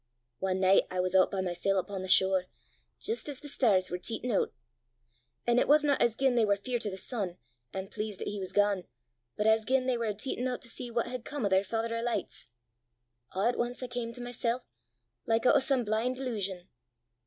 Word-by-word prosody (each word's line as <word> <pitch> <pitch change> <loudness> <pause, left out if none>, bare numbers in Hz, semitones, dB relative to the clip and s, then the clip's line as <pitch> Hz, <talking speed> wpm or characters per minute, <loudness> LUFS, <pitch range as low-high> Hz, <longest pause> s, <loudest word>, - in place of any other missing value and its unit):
Ae 190 -1 +1
nicht 190 +1 +4
I 185 - -3
was 185 0 0
oot 190 -1 +5
by 195 - -2
mysel' 185 +2 0
upo' 195 +1 -2
the 185 - -5
shore, 190 0 +4 0.5
jist 445 -8 -1
as 280 - -4
the 295 - -10
stars 205 -10 +2
war 180 - -2
teetin' 230 +6 -2
oot. 200 - +1 0.9
An' 240 0 +4
it - - +2
wasna 295 -1 +5
as 235 -2 +3
gien 265 +1 +2
they 235 -2 +3
war 205 -1 +3
feart 235 +2 -2
o' - - 0
the 190 - -6
sun, 190 -3 -3 0.3
an' 190 0 -4
pleast 210 -1 -5
'at - - -4
he 205 - -3
was 185 -1 -5
gane, 205 -2 +2 0.5
but 210 - 0
as 220 0 +4
gien 255 +2 +1
they 255 -2 +1
war 230 - -1
a' 210 - -1
teetin' 250 +3 -2
oot 250 -1 -3
to 235 - -5
see 240 +1 -4
what 235 0 0
had 245 -1 -5
come 285 -5 -3
o' - - +2
their 190 0 +4
Father 230 +3 -2
o' 230 - -1
Lichts. 240 - -3 0.9
A' 195 +5 +2
at 245 - -2
ance 245 +2 -2
I - - -1
cam 245 -1 -4
to 245 - -8
mysel', 245 0 -2 0.6
like 225 +1 +2
oot 255 - +6
o' - - +7
some 265 -2 +1
blin' 225 +4 0
delusion. 200 -8 -3
225 Hz, 225 wpm, -30 LUFS, 190-245 Hz, 0.9 s, o